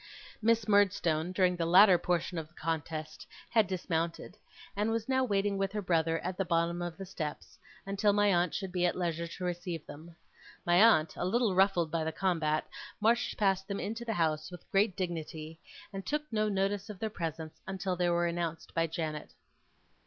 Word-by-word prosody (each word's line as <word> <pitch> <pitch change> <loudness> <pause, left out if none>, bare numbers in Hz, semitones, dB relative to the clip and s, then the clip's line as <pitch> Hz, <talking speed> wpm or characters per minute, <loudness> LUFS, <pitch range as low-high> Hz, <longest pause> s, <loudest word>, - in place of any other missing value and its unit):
Miss 230 0 +2
Murdstone, 185 -5 +2
during 185 -1 +2
the 170 -1 -1
latter 185 +1 +7
portion 175 0 -1
of 155 - -7
the 170 - -30
contest, 155 -1 -4 0.2
had 220 -4 +4
dismounted, 170 -1 -2 0.4
and 210 +2 0
was 225 0 -1
now 260 0 +2
waiting 200 -3 0
with 195 -1 0
her 210 - -1
brother 165 -2 +1
at 180 0 -4
the - - +3
bottom 170 0 0
of 175 -2 -4
the 195 - -6
steps, 160 -5 -6 0.3
until 200 +1 +2
my 205 -1 +3
aunt 175 -1 +1
should 190 -3 -3
be 180 -1 -1
at 175 - +2
leisure 170 -2 -2
to 180 - -8
receive 175 -2 -3
them. 165 +3 -11 0.5
My 175 +2 +5
aunt, 190 -9 +5
a - - -2
little 215 +3 +2
ruffled 185 -4 +3
by 165 -1 0
the 160 - -1
combat, 160 -3 0 0.3
marched 230 +3 +2
past 195 -2 +1
them 200 -1 -3
into 225 +3 -4
the 230 -1 -2
house, 155 -2 0
with 180 -1 -11
great 195 -1 +2
dignity, 160 -3 -5 0.3
and 195 0 -5
took 300 +6 -1
no 215 0 +1
notice 200 +1 -1
of 210 - -7
their 220 +2 -3
presence, 160 -3 -5
until 190 -1 -2
they 175 0 +1
were 175 0 +2
announced 170 -1 -3
by 165 0 +1
Janet. 155 -2 -5
180 Hz, 190 wpm, -31 LUFS, 165-200 Hz, 0.5 s, latter